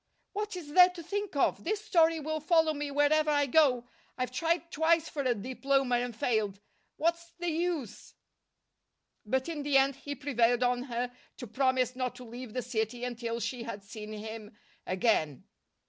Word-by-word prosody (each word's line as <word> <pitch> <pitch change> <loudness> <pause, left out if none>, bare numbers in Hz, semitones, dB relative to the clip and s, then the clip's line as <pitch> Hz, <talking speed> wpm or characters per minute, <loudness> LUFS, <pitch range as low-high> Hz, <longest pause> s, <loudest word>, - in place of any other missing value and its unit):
"What 420 0 -3
is 305 -5 -8
there 360 +1 +8
to 360 -2 -9
think 405 +1 -3
of? 280 - +1
This 415 +5 -1
story 330 -5 +4
will 310 +1 -2
follow 320 0 +3
me 290 -1 -3
wherever 290 +2 +3
I 290 -1 +3
go! 260 -4 +3 0.3
I've 255 -1 -2
tried 335 +5 0
twice 325 +1 +2
for 295 - -3
a 255 -3 +1
diploma 260 +3 +1
and 245 -1 -3
failed. 215 -4 0 0.4
What's 340 +1 -1
the 350 0 -2
use?" 320 - -3 1.1
But 260 +4 0
in 320 -3 -3
the 285 -1 +3
end 270 0 +3
he 285 +1 -6
prevailed 245 -3 +2
on 245 0 +1
her 245 -1 -3 0.3
to - - -6
promise 255 +1 +1
not 255 -1 -2
to 250 - -10
leave 240 -1 -9
the 250 - -2
city 235 0 -2
until 235 -1 -3
she 235 +2 -3
had 220 -4 -6
seen 210 +1 -8
him 215 0 -8 0.3
again. 180 - +1
260 Hz, 175 wpm, -30 LUFS, 240-315 Hz, 1.1 s, there